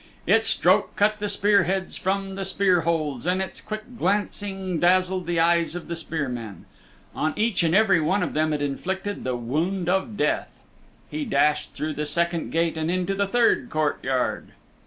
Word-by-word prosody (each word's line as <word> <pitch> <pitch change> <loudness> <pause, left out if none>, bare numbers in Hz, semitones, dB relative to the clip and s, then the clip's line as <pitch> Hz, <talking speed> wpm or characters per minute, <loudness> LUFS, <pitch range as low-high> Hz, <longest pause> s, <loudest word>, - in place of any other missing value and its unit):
Its - - +3
stroke - - +2
cut 210 +1 +2
the 205 0 -2
spear 205 0 +3
heads 190 +1 -2
from 195 +1 -2
the 195 0 -4
spear 190 -2 +2
holds, 155 -4 -1
and 180 +1 +2
its 190 - -4
quick 215 0 -5
glancing 195 -2 -1
dazzled 185 +1 +2
the 170 -1 0
eyes 170 0 +2
of 175 - -6
the 170 - -3
spear 160 -3 -3
men. 115 -7 -7 0.5
On 155 - -1
each 220 -2 +1
and 165 0 +2
every 195 -5 +4
one 185 +7 +1
of - - -3
them 155 +1 +1
it 150 -1 -1
inflicted 190 +8 -3
the 130 -1 -1
wound 165 +10 -2
of 190 +3 0
death. - - 0 0.6
He 305 - -3
dashed 150 - +1
through 155 0 -3
the 150 +1 -3
second 170 +2 0
gate 165 0 0
and 160 +1 -1
into 185 +2 0
the 200 0 0
third 240 +3 +2
courtyard. 145 - -1
175 Hz, 180 wpm, -24 LUFS, 155-195 Hz, 0.6 s, every